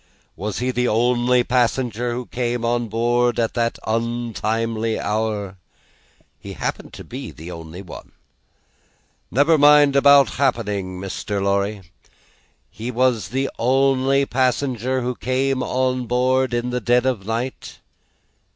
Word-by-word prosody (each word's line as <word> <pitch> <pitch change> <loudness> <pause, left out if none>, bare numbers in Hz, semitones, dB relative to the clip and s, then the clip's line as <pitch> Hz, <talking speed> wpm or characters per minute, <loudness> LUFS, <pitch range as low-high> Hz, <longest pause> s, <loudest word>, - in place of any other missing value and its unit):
Was 105 +3 -4
he 125 +1 -1
the 125 0 0
only 120 +2 +2
passenger 120 -1 0
who 125 0 -4
came 120 -1 -2
on 120 0 0
board 120 +2 +1
at 115 -1 0
that 115 -1 -1
untimely 115 -1 -1
hour?" 105 -3 -2 0.8
"He - - -8
happened - - -4
to - - -9
be - - -7
the 80 +3 -10
only 85 +2 -9
one." 90 - -11 1.2
"Never 145 +5 +3
mind 145 -1 +6
about 140 0 +6
'happening,' 105 -8 -1
Mr. 100 +1 -4
Lorry. 100 +1 0 0.9
He 115 +3 -6
was 125 -5 +1
the 135 +6 -1
only 135 +2 +2
passenger 130 -1 0
who 125 +1 -2
came 130 +1 -1
on 130 -1 -1
board 130 +2 +1
in 120 +1 -1
the 125 0 -2
dead 120 +2 +2
of 130 -4 +1
the 95 - -18
night?" 115 +4 -4
120 Hz, 135 wpm, -21 LUFS, 110-130 Hz, 1.2 s, mind